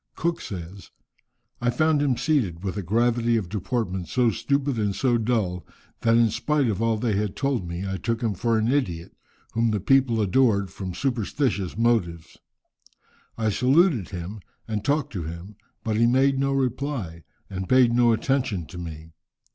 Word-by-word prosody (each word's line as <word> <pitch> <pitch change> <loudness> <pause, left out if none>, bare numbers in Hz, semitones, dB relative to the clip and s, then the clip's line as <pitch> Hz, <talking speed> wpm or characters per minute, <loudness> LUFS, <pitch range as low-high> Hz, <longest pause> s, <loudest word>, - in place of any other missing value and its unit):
Cook 170 +1 -1
says, 95 +1 -8 0.7
"I 120 - +2
found 155 +4 +2
him 135 -4 +1
seated, 120 - 0
with 95 -2 -3
a 105 - -2
gravity 115 +4 +1
of 95 -6 -3
deportment 95 -3 -2
so 120 +5 +2
stupid 140 -2 -1
and 100 -2 0
so 120 -3 +2
dull, 105 -6 -1 0.4
that 115 0 +3
in 115 -2 +4
spite 140 +4 +1
of 110 -1 -1
all 115 -1 +2
they 110 0 0
had 105 -1 -1
told 130 -9 -1
me, 85 +3 -4
I 95 0 -2
took 115 +5 -2
him 110 -3 +1
for 115 +4 0
an 110 0 +1
idiot, 115 -12 -1 0.4
whom 115 0 +2
the 105 -1 0
people 125 +2 +3
adored 100 -2 +2
from 95 -3 -6
superstitious 120 -5 -1
motives. 100 -9 0 1.0
I 110 -2 +1
saluted 130 - +3
him, 95 +3 -6 0.3
and 105 -2 -3
talked 145 -1 0
to 95 - -3
him, 85 +6 -8 0.3
but 110 -1 -1
he 115 +1 +4
made 135 +2 +3
no 135 0 +1
reply, 130 - -2 0.3
and 95 -1 -5
paid 130 -2 +5
no 120 -1 +4
attention 115 - 0
to 90 - -8
me. 80 -1 -8
115 Hz, 170 wpm, -25 LUFS, 95-130 Hz, 1.0 s, paid